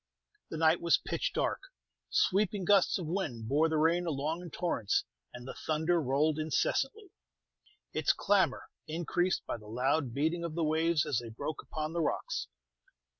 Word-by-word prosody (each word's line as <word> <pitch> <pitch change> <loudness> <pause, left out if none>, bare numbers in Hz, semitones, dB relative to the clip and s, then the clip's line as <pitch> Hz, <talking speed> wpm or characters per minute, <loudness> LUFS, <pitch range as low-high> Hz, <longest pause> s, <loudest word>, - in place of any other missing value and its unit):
The 160 - -5
night 160 +1 +4
was 170 - +4
pitch - - -2
dark; - - -1 0.5
sweeping 200 0 +2
gusts 200 -1 +4
of 180 - -5
wind 150 - -3
bore 150 +6 +3
the 160 - +1
rain 170 +3 +2
along 155 +3 -2
in 175 - -8
torrents, 145 - 0 0.3
and 125 +1 -10
the - - -5
thunder 160 +2 0
rolled 150 +3 +1
incessantly, 270 - -1 0.8
its - - +3
clamor - - +1 0.2
increased 175 +3 0
by - - -3
the 105 -2 -14
loud 130 +4 0
beating 160 +7 0
of 165 -2 -4
the 170 - 0
waves 160 0 +2
as 145 -6 0
they 120 -1 -8
broke 140 +7 -5
upon 155 0 -4
the 170 - 0
rocks. 150 - -2
160 Hz, 165 wpm, -31 LUFS, 145-175 Hz, 0.8 s, night